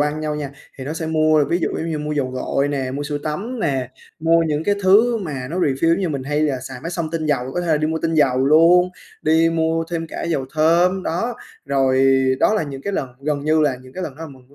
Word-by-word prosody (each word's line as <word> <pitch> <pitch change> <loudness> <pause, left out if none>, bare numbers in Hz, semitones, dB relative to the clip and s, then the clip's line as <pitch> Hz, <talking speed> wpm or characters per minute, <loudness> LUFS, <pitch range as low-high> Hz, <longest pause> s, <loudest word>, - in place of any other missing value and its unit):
ăn 150 +1 0
nhau 155 -1 -2
nha, 145 -2 -4 0.3
thì 130 - -6
nó 150 - -4
sẽ 160 0 -4
mua 155 -1 +3
ví 170 +4 0
dụ - - 0
giống 165 +1 -3
như 155 - -2
mua 150 0 -3
dầu 135 -3 -1
gội 135 +2 -1
nè, 135 -3 -2
mua 140 +2 -4
sữa 145 0 -3
tắm 205 - -4
nè, 135 -7 -1 0.3
mua 165 +1 +4
những 155 -1 -1
cái 205 - +2
thứ 215 +6 +5
mà 140 -9 -5
nó 180 - -3
refill 145 -1 +1
giống 165 - +3
như 185 - 0
mình 140 -3 -3
hay 145 +3 -1
là 140 -4 0
xài 130 -1 -8
máy 165 - -4
xông 170 -2 -3
tinh 160 -1 -2
dầu, 135 -3 -1
có 175 - 0
thể 175 - -4
là 160 -2 +3
đi 155 +1 0
mua 160 +1 -1
tinh 165 0 0
dầu 135 -4 +3
luôn, 170 +4 +5 0.3
đi 160 +1 +3
mua 165 0 0
thêm 165 -1 -3
cả - - -6
dầu 150 -6 -1
thơm, 175 +4 +3
đó, 225 +9 -2 0.3
rồi 135 -1 +3 0.2
đó - - +4
là 215 - +1
những 135 -2 -7
cái 200 - -3
lần 135 - -2
gần 145 0 -2
như 155 +1 +3
là 145 -4 +2
những 130 0 -15
cái 185 - -5
lần 140 - -5
đó 160 - -9
là 165 - -6
mình 130 -3 -16
mua 140 - -22
155 Hz, 275 wpm, -20 LUFS, 140-165 Hz, 0.3 s, thứ